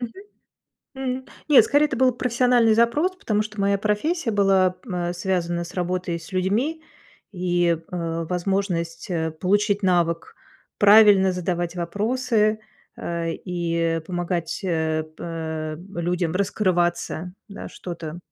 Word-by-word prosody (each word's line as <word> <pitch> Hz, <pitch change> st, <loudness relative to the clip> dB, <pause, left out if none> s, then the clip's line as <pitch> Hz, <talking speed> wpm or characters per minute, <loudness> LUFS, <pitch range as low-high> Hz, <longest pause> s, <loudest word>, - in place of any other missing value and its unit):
мгм. 240 Hz, -2 st, -5 dB, 0.8 s
М, 260 Hz, -1 st, -3 dB, 0.2 s
нет, 290 Hz, -, +8 dB
скорее, 290 Hz, +1 st, +3 dB
это -, -, -4 dB
был 255 Hz, +1 st, +4 dB
профессиональный 245 Hz, -2 st, +3 dB
запрос, 295 Hz, +11 st, +2 dB
потому 215 Hz, -, 0 dB
что 215 Hz, -1 st, -7 dB
моя 200 Hz, 0 st, +2 dB
профессия 230 Hz, -, 0 dB
была, 195 Hz, -2 st, +3 dB, 0.2 s
э, 175 Hz, -1 st, -1 dB
связана 175 Hz, -1 st, -1 dB
с 175 Hz, +3 st, -11 dB
работой 180 Hz, -1 st, -2 dB
и -, -, -5 dB
с 165 Hz, -, -13 dB
людьми, 220 Hz, -, 0 dB, 0.5 s
и, 175 Hz, -2 st, +1 dB
э, 165 Hz, -2 st, -3 dB
возможность, 180 Hz, -2 st, -2 dB
э, 160 Hz, -2 st, -1 dB
получить 205 Hz, +5 st, +1 dB
навык 170 Hz, -3 st, +1 dB, 0.4 s
правильно 205 Hz, -2 st, +7 dB
задавать 175 Hz, -1 st, -2 dB
вопросы, 215 Hz, +4 st, 0 dB, 0.4 s
э, 170 Hz, -1 st, -3 dB
и 170 Hz, -2 st, -1 dB
помогать, 175 Hz, -2 st, -2 dB
э, 160 Hz, -3 st, 0 dB
пэ 160 Hz, -2 st, -4 dB, 0.2 s
людям 175 Hz, -1 st, -1 dB
раскрываться, 180 Hz, -2 st, 0 dB, 0.2 s
да, 200 Hz, -, -8 dB
что-то, 170 Hz, -2 st, -7 dB
185 Hz, 125 wpm, -23 LUFS, 170-215 Hz, 0.8 s, нет